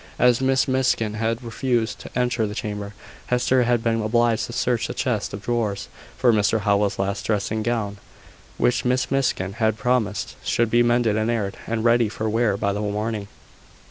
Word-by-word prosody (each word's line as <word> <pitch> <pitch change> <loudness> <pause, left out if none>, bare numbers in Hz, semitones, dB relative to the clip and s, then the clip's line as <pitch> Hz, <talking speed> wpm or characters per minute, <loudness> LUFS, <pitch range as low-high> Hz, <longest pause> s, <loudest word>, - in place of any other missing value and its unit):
As 125 0 +4
Miss 130 0 +2
Miskin 130 -5 +1
had 115 +2 -2
refused 120 -1 -1
to - - -9
enter 120 -3 +1
the 105 - -6
chamber, 105 -3 -5 0.3
Hester 125 +1 +2
had 120 -1 +1
been 115 -1 +1
obliged 115 +1 +1
to - - -8
search 120 -1 0
a - - -5
chest 120 -6 -1
of 100 0 -7
drawers 110 -3 -2 0.3
for 120 -2 +4
Mr 110 +1 +2
Howell's 100 -1 +1
last 100 +1 -2
dressing 110 +1 -1
gown, 110 -3 -2 0.6
which 120 0 +2
Miss 125 +1 0
Miskin 120 -8 0
had 110 -1 +1
promised 115 -2 -1
should 115 -1 +1
be 120 - +4
mended 120 -2 +2
and 110 +1 0
aired, 105 -4 -1
and 115 0 -2
ready 120 -2 +4
for 110 +1 -3
wear 110 -2 +1
by 100 0 0
the 105 - -3
morning. 105 0 -2
115 Hz, 180 wpm, -23 LUFS, 105-120 Hz, 0.6 s, As